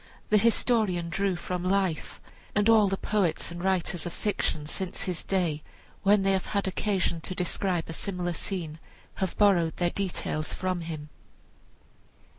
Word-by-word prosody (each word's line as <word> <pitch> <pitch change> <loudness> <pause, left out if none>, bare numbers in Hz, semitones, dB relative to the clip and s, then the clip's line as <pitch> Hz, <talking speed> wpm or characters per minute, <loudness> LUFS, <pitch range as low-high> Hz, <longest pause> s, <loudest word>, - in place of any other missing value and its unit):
The 210 - +6
historian 215 -6 +2
drew 195 +2 0
from 180 +1 -3
life, 185 -3 0 0.4
and 205 +1 +3
all 220 -2 +6
the 195 0 0
poets 190 -7 0
and 175 +1 -6
writers 185 -3 0
of 175 - -6
fiction 160 -7 -1
since 185 +4 -4
his 180 -3 -3
day, 175 -6 0 0.4
when 200 0 +4
they 195 - +3
have 190 -1 0
had 200 - +1
occasion 190 -3 0
to 185 - -5
describe 180 -1 -1
a 165 - -5
similar 180 -1 -2
scene, 165 -4 -4 0.4
have 190 -2 -2
borrowed 175 -6 +4
their 175 -1 +1
details 175 -5 -2
from 185 -1 -1
him. 155 -2 -6
185 Hz, 155 wpm, -28 LUFS, 170-200 Hz, 0.4 s, The